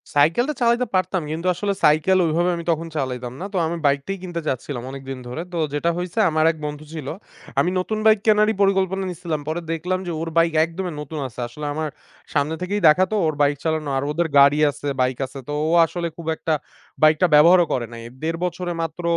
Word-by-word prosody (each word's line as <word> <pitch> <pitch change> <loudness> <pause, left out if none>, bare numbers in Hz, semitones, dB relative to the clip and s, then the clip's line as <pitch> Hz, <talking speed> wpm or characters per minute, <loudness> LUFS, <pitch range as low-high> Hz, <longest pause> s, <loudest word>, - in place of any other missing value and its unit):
সাইকেলটা 165 - +3
চালাইতে 240 +1 +3
পারতাম, 185 0 +1
কিন্তু 165 +3 -3
আসলে 200 +3 -1
সাইকেল 155 +5 +4
ওইভাবে 170 +3 +1
আমি 170 - -5
তখন 165 +1 -2
চালাইতাম 125 -3 -3
না। - - -3
তো - - -1
আমি 170 +1 -3
বাইকটাই 140 +7 +1
কিনতে 175 -2 -5
চাচ্ছিলাম, 130 -1 -3
অনেকদিন 135 -1 -7
ধরে। 125 +6 -5
তো - - -2 0.2
যেটা 150 +3 0
হইছে 180 +4 -3
,আমার 155 0 +2
এক 160 - -12
বন্ধু 150 +1 -6
ছিল। 155 -4 -6 0.5
আমি 175 - +3
নতুন 215 +4 -2
বাইক 220 -1 +6
কেনারই 215 0 +4
পরিকল্পনা 195 -1 +2
নিসিলাম। 170 -4 -4
পরে 160 +2 -2
দেখলাম 180 +3 -1
যে - - -2
ওর 165 - -3
বাইক 165 0 +4
একদমই 175 +1 -5
নতুন 150 +1 -6
আছে। 125 -1 -12
আসলে 150 +5 -8
আমার 155 +1 -2 0.4
সামনে 150 +2 +1
থেকেই 200 +3 -2
দেখা 155 +5 +6
তো, - - 0
ওর 155 - 0
বাইক 145 0 +3
চালানো 155 -2 -1
আর 135 - -1
ওদের 170 +2 0
গাড়ি 140 +2 +6
আছে, 145 - -7
বাইক 130 -1 +1
আছে; 130 +1 -9
তো - - -2 0.2
ও - - 0
আসলে 170 +1 -3
খুব 170 -2 -9
একটা 160 - -1 0.5
বাইকটা 155 +3 +5
ব্যবহারও 170 +4 +7
করে 120 - -1
নাই। 115 - -8 0.2
১.৫ 165 +1 -1
বছরে 180 0 -3
মাত্র 165 +2 -4
165 Hz, 205 wpm, -22 LUFS, 150-180 Hz, 0.5 s, ব্যবহারও